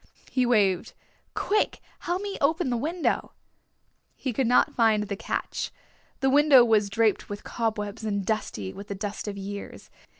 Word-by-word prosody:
He 255 -2 +2
waved. 200 -7 +2 0.4
"Quick, 420 +1 +1 0.2
help 360 +3 -2
me 405 -1 -4
open 290 -1 +2
the - - +1
window." 315 +8 -1 0.8
He 260 - -3
could 255 +2 +1
not 245 - +4
find 220 -3 +3
the 200 -1 -4
catch. 195 - -3 0.5
The 265 - +3
window 285 -3 +7
was 215 -3 +3
draped 220 +1 +1
with 205 0 -6
cobwebs 215 -2 -3
and 200 -3 -1
dusty 110 - -2
with 200 - -9
the 200 - -4
dust 205 +1 -5
of 200 -1 -4
years. 200 +1 -7
220 Hz, 160 wpm, -26 LUFS, 205-265 Hz, 0.8 s, window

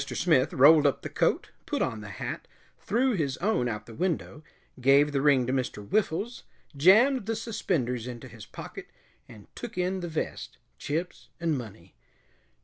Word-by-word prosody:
Smith 155 -6 +1
rolled 145 +2 +6
up 140 - -1
the - - -4
coat, - - 0 0.2
put - - -1
on 110 -1 -2
the 105 - -8
hat, - - -6 0.3
threw 250 +6 +1
his 150 - -1
own 185 - 0
out 105 -2 -4
of - - -30
the 115 - -11
window, 165 -1 -3 0.4
gave 140 +3 +5
the 140 -1 0
ring 140 -3 +4
to 130 - -1
Mr. 125 -6 -3
Whiffles, 215 - -1 0.3
jammed 215 - +5
the 225 - 0
suspenders 145 - -2
into 125 +1 -8
his 115 -3 -12
pocket, - - -9 0.4
and 105 -3 -13
took 240 -6 -8
in 185 +1 0
the 175 - -4
vest, 155 - -4 0.2
chips 165 +5 -4
and 165 -2 0
money. 105 -8 -9
145 Hz, 170 wpm, -28 LUFS, 125-185 Hz, 0.4 s, rolled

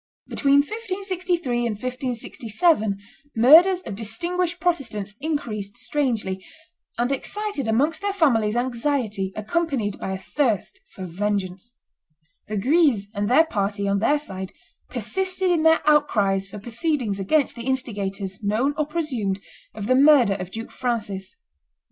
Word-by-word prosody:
Between 280 0 +4
1563 370 - -2
and 235 -3 -1
1567 245 - 0 0.4
murders 330 +11 +7
of 225 - -6
distinguished 340 - -2
Protestants 235 - -1
increased 220 -10 -3
strangely, 220 -10 -1 0.5
and 240 +3 0
excited 405 - -3
amongst 285 +9 +1
their 405 0 0
families 240 - +2
anxiety 240 -5 -1
accompanied 235 - -1
by 190 - -3
a - - -3
thirst 245 - -1
for 190 - -8
vengeance. 195 +4 -3 0.7
The 215 - -3
Guises 255 - +3
and 205 0 -1
their 300 +6 +6
party, 200 -6 -1
on 200 0 +1
their 290 +8 +3
side, 190 -9 -6 0.4
persisted 380 -1 -1
in 335 -2 +2
their 320 -1 +4
outcries 205 -10 +3
for 195 - -9
proceedings 235 - -2
against 275 +10 +1
the 235 +1 -7
instigators, 200 -6 -2
known 220 +8 +1
or 300 - +1
presumed, 255 - -2 0.4
of 210 -2 -5
the 255 - +3
murder 265 -6 +6
of 185 -2 -5
Duke 225 +4 -7
Francis. 220 - -3
240 Hz, 130 wpm, -23 LUFS, 205-305 Hz, 0.7 s, murders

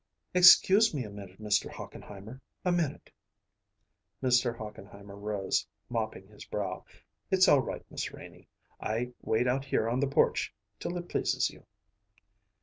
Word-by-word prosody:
"Excuse 185 +2 +7
me 135 - -1
a 105 - -8
minute, 100 -2 -11
Mr. 105 -1 +1
Hochenheimer 105 +6 -10 0.2
a 180 - +3
minute." 170 -5 -1 1.1
Mr. 125 -2 +3
Hochenheimer 100 -2 -10
rose, 100 -1 -1 0.2
mopping 110 -4 -3
his 105 0 -13
brow. 95 -3 -4 0.5
"It's 190 -1 +5
all 145 - +7
right, - - -6
Miss - - -4
Renie. - - -13 0.3
I 120 +3 -2
wait 115 +3 +1
out 135 +2 0
here 115 - 0
on 120 +2 0
the 140 - +2
porch 140 - +1 0.2
till 175 - -3
it 175 0 -6
pleases - - 0
you." - - -18
115 Hz, 145 wpm, -30 LUFS, 105-140 Hz, 1.1 s, Excuse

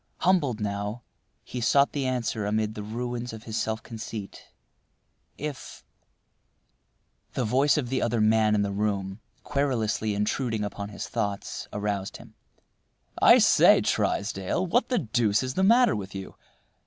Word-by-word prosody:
Humbled 150 - +2
now, 105 +2 -3 0.4
he 125 - -6
sought 140 +4 +4
the 140 -3 -2
answer 120 -4 -1
amid 110 0 0
the 105 - -6
ruins 120 +2 -4
of 110 0 -9
his 110 - -6
self 110 0 -2
conceit. 110 -3 -8 0.9
If— 145 -2 -7 1.5
The 125 - -1
voice 135 +7 +3
of 130 -5 -2
the 130 0 0
other 120 0 0
man 110 0 +3
in 100 - +2
the 100 - -2
room, 100 -1 -2 0.2
querulously 115 -7 -1
intruding 110 +2 -1
upon 100 0 -5
his 100 - -6
thoughts, 100 -1 -3
aroused 100 -2 -3
him. - - -15 0.9
"I - - +8
say, - - +6
Trysdale, 100 - -1
what 230 +8 +1
the 250 - +1
deuce 115 - +1
is 130 0 -3
the 190 - 0
matter 235 +5 +5
with 100 -1 -6
you? 95 -1 -7
110 Hz, 145 wpm, -26 LUFS, 105-130 Hz, 1.5 s, I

